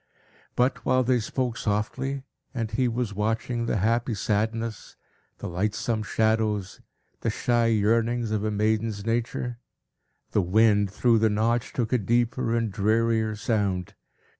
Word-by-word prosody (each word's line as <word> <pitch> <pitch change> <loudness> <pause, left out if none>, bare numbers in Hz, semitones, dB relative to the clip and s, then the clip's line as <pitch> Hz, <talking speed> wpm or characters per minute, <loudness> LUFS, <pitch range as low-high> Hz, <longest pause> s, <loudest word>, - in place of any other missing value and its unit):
But, 125 +2 +1
while 130 0 +3
they 125 0 +2
spoke 120 +1 -2
softly, 125 +6 -2 0.3
and 115 -3 -2
he 130 -1 +1
was 120 -2 -2
watching 115 +3 -1
the - - 0
happy 115 +3 +1
sadness, 110 +2 -2 0.4
the - - -6
lightsome 105 +5 -1
shadows, 110 -2 0 0.4
the - - -1
shy 120 -1 +1
yearnings 115 +1 +1
of 105 -1 0
a 110 - 0
maiden's 105 0 0
nature, 120 +1 -2 0.7
the 105 - +3
wind, 105 +2 +3
through 115 +3 +3
the 110 0 +3
Notch, 110 +3 0
took 120 -1 -2
a 125 - +3
deeper 115 +2 +1
and 115 -2 0
drearier 110 +1 +1
sound. 100 -4 -1
110 Hz, 140 wpm, -26 LUFS, 105-120 Hz, 0.7 s, while